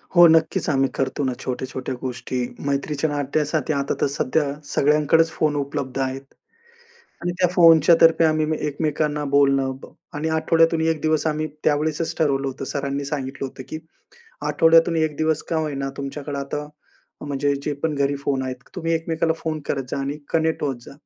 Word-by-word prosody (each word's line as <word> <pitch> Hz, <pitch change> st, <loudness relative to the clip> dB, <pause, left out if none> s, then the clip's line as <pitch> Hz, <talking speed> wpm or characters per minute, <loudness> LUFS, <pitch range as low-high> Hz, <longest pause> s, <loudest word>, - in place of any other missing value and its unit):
हो, 175 Hz, 0 st, +9 dB
नक्कीच. 160 Hz, -1 st, +2 dB
आम्ही 135 Hz, -2 st, +2 dB
करतो 135 Hz, +1 st, -1 dB
ना, 130 Hz, -, 0 dB
छोट्या-छोट्या 130 Hz, 0 st, -4 dB
गोष्टी 125 Hz, 0 st, -4 dB, 0.3 s
मैत्रीच्या 140 Hz, +2 st, -1 dB
नात्यासाठी 150 Hz, +1 st, -1 dB
आता 140 Hz, 0 st, -1 dB
तर -, -, +3 dB
सध्या 140 Hz, +2 st, 0 dB, 0.2 s
सगळ्यांकडेच 150 Hz, +3 st, +3 dB
फोन 150 Hz, -2 st, 0 dB
उपलब्ध 135 Hz, -2 st, -3 dB
आहेत 135 Hz, 0 st, -2 dB, 1.0 s
आणि 175 Hz, 0 st, -1 dB
त्या 180 Hz, -1 st, +3 dB
फोनच्या 165 Hz, -1 st, +7 dB
तर्फे 165 Hz, 0 st, +6 dB
आम्ही 155 Hz, -1 st, +2 dB, 0.2 s
एकमेकांना 150 Hz, 0 st, -1 dB
बोलणं 135 Hz, -1 st, +3 dB
ब -, -, -9 dB, 0.3 s
आणि 150 Hz, +2 st, -2 dB
आठवड्यातून 165 Hz, +1 st, +3 dB
1 160 Hz, -1 st, +1 dB
आम्ही 155 Hz, 0 st, 0 dB, 0.2 s
त्यावेळेसच 155 Hz, +2 st, 0 dB
ठरवलं 140 Hz, -3 st, +1 dB
होतं, 135 Hz, +1 st, -6 dB
सरांनी 140 Hz, 0 st, -3 dB
सांगितलं 135 Hz, -1 st, -4 dB
होतं 130 Hz, -, -9 dB
की 155 Hz, -, -5 dB, 0.7 s
आठवड्यातून 165 Hz, +1 st, +4 dB
1 155 Hz, -2 st, 0 dB
दिवस 155 Hz, -1 st, 0 dB
का 165 Hz, -, +1 dB
होईना, 145 Hz, -3 st, -2 dB
तुमच्याकडे 140 Hz, +1 st, -5 dB
आता 145 Hz, +2 st, -4 dB, 0.6 s
म्हणजे 140 Hz, 0 st, 0 dB
जे 150 Hz, -, -2 dB
पण 160 Hz, -2 st, 0 dB
घरी 140 Hz, 0 st, 0 dB
फोन 140 Hz, -1 st, -1 dB
आहेत, 130 Hz, -1 st, -4 dB, 0.2 s
तुम्ही 165 Hz, -2 st, -2 dB
एकमेकाला 160 Hz, 0 st, 0 dB
फोन 155 Hz, -2 st, -4 dB
करत 135 Hz, -1 st, -1 dB
जा -, -, -2 dB
आणि 140 Hz, +2 st, -3 dB
कनेक्ट 160 Hz, -1 st, 0 dB
होत 135 Hz, -3 st, -1 dB
जा. -, -, -10 dB
150 Hz, 160 wpm, -22 LUFS, 140-160 Hz, 1.0 s, हो